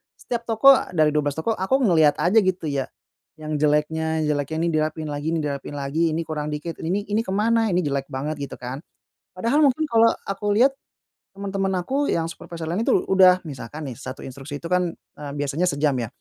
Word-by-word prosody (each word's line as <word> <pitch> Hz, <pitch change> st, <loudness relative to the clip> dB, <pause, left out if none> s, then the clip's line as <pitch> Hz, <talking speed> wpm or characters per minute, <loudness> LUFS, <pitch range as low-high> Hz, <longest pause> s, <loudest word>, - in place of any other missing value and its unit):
setiap 235 Hz, -1 st, -4 dB
toko, 230 Hz, +4 st, +7 dB, 0.2 s
dari 155 Hz, -1 st, +4 dB
12 145 Hz, -2 st, 0 dB
toko 225 Hz, -, 0 dB
aku 260 Hz, +9 st, +1 dB
ngeliat 160 Hz, -7 st, +4 dB
aja 200 Hz, +6 st, +4 dB
gitu 185 Hz, -3 st, 0 dB
ya. 135 Hz, -2 st, -1 dB, 0.5 s
Yang 155 Hz, -1 st, -3 dB
jeleknya 160 Hz, +1 st, 0 dB
jeleknya, 150 Hz, 0 st, -1 dB
ini 170 Hz, -, +1 dB
dirapihin 155 Hz, 0 st, -1 dB
lagi 145 Hz, +2 st, -4 dB
ini 165 Hz, -, 0 dB
dirapihin 145 Hz, 0 st, -4 dB
lagi, 140 Hz, +3 st, -2 dB
ini 165 Hz, +2 st, -1 dB
kurang 150 Hz, -1 st, -3 dB
dikit, 150 Hz, +3 st, -4 dB
ini 195 Hz, +5 st, -1 dB
ini 215 Hz, -, +2 dB
ke 190 Hz, -, -5 dB
mana? 225 Hz, +2 st, +2 dB
Ini 175 Hz, -, +2 dB
jelek 140 Hz, -2 st, -2 dB
banget 145 Hz, +3 st, -3 dB
gitu 140 Hz, -, -5 dB
kan. 125 Hz, +2 st, -6 dB, 0.6 s
Padahal 235 Hz, +11 st, +1 dB
mungkin 275 Hz, +3 st, +1 dB
kalau 230 Hz, 0 st, +5 dB, 0.2 s
aku 205 Hz, +1 st, -1 dB
liat, 250 Hz, +6 st, +5 dB, 0.7 s
temen-temen 195 Hz, -1 st, -2 dB
aku 280 Hz, +7 st, 0 dB
yang 165 Hz, 0 st, 0 dB
supervisor 170 Hz, -1 st, -8 dB
lain 185 Hz, +7 st, -1 dB
itu -, -, +2 dB, 0.2 s
udah 185 Hz, -1 st, +6 dB
misalkan 145 Hz, +2 st, -7 dB
nih 120 Hz, -, -8 dB
1 130 Hz, 0 st, -7 dB
instruksi 140 Hz, +2 st, -7 dB
itu 165 Hz, -, -4 dB
kan, 180 Hz, -1 st, +2 dB
eee, 145 Hz, -1 st, -11 dB
biasanya 145 Hz, +3 st, -1 dB
sejam 145 Hz, -2 st, +1 dB
ya. 115 Hz, -, -2 dB
160 Hz, 195 wpm, -23 LUFS, 145-195 Hz, 0.7 s, toko